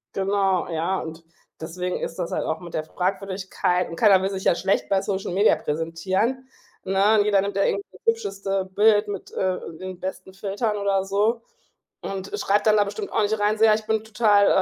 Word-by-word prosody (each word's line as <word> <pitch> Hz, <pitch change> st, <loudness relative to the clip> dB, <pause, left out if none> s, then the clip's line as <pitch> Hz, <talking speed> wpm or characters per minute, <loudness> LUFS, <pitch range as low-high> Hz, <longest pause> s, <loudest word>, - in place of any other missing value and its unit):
Genau, 195 Hz, -1 st, +1 dB
ja, 170 Hz, +3 st, -1 dB
und 160 Hz, +1 st, -8 dB, 0.4 s
deswegen 180 Hz, +3 st, -3 dB
ist 165 Hz, -, -5 dB
das 170 Hz, -, -3 dB
halt -, -, -1 dB
auch 160 Hz, -, -2 dB
mit 175 Hz, -1 st, -11 dB
der 155 Hz, -, -1 dB
Fragwürdigkeit 185 Hz, 0 st, -1 dB
und 165 Hz, -, -6 dB
keiner 195 Hz, +1 st, +5 dB
will 190 Hz, -, 0 dB
sich 190 Hz, -1 st, -5 dB
ja -, -, +3 dB
schlecht 190 Hz, +3 st, 0 dB
bei 195 Hz, -1 st, +2 dB
Social 195 Hz, -2 st, -3 dB
Media 200 Hz, +4 st, +4 dB
präsentieren, 190 Hz, -, -2 dB, 0.3 s
ne? 195 Hz, +3 st, +3 dB
Und 205 Hz, -, +3 dB
jeder 205 Hz, -2 st, +3 dB
nimmt 200 Hz, 0 st, -3 dB
da 200 Hz, -, +2 dB
irgendwie 400 Hz, -, 0 dB, 0.2 s
hübscheste 195 Hz, -, -1 dB
Bild 210 Hz, +2 st, +3 dB
mit, 205 Hz, -, -6 dB
äh, 185 Hz, -1 st, -1 dB, 0.2 s
den 185 Hz, -1 st, -7 dB
besten 190 Hz, 0 st, -6 dB
Filtern 205 Hz, +3 st, -2 dB
oder 200 Hz, -1 st, 0 dB
so 210 Hz, +4 st, +1 dB, 0.6 s
und 195 Hz, 0 st, -5 dB
schreibt 205 Hz, +2 st, +1 dB
dann 215 Hz, -, +6 dB
da 205 Hz, -, +5 dB
bestimmt 405 Hz, -, -6 dB
auch -, -, +1 dB
nicht 215 Hz, +1 st, 0 dB
rein, 210 Hz, +1 st, +1 dB
so: 220 Hz, -, +2 dB
„Ja 215 Hz, -, +6 dB
ich, 220 Hz, 0 st, -5 dB
bin 220 Hz, -1 st, 0 dB
total, 210 Hz, -2 st, +3 dB
195 Hz, 200 wpm, -24 LUFS, 185-210 Hz, 0.6 s, dann